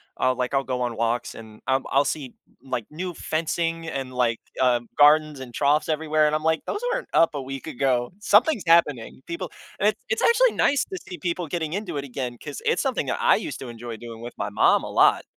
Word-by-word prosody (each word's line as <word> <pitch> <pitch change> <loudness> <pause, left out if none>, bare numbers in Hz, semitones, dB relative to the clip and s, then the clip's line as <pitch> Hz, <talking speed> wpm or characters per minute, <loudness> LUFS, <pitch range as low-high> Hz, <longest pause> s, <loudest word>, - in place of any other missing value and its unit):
I'll 130 0 +1
like, 125 +1 -2
I'll 135 0 +2
go 125 -1 -3
on 120 -2 -2
walks 115 +1 -1
and, 110 -1 -12
um, 130 0 +1
I'll 140 +1 +3
see, 135 -5 -4 0.3
like, 125 -5 -3
new 175 +3 -5
fencing 165 +1 -2
and, 135 -4 -4
like, 120 -2 +1 0.2
uh, 125 -2 +3 0.2
gardens 150 0 +5
and 130 -2 -8
troughs 145 +5 +2
everywhere, 155 0 +2
and 150 - +1
I'm 155 - -2
like, 160 0 +2
"Those 410 - -3
weren't - - -2
up 165 - +5
a 145 - -3
week 135 0 -7
ago, 125 0 0
something's 215 - +4
happening, 150 -7 +2
people" 170 0 -5 0.3
and 205 - +4
it's - - -4
it's 475 0 0
actually - - +5
nice 280 - +2
to 375 - -6
see 180 - -6
people 170 +1 -3
getting 160 -1 -3
into 190 -7 -3
it 140 - -3
again, 125 -2 -5
'cause 145 +1 -8
it's - - +2
something - - -1
that - - -2
I - - +5
used - - -5
to 130 - -7
enjoy 115 -1 -7
doing 115 -1 -9
with 120 - -9
my 100 - -3
mom - - +4
a - - -6
lot. - - +4
145 Hz, 225 wpm, -24 LUFS, 125-165 Hz, 0.3 s, gardens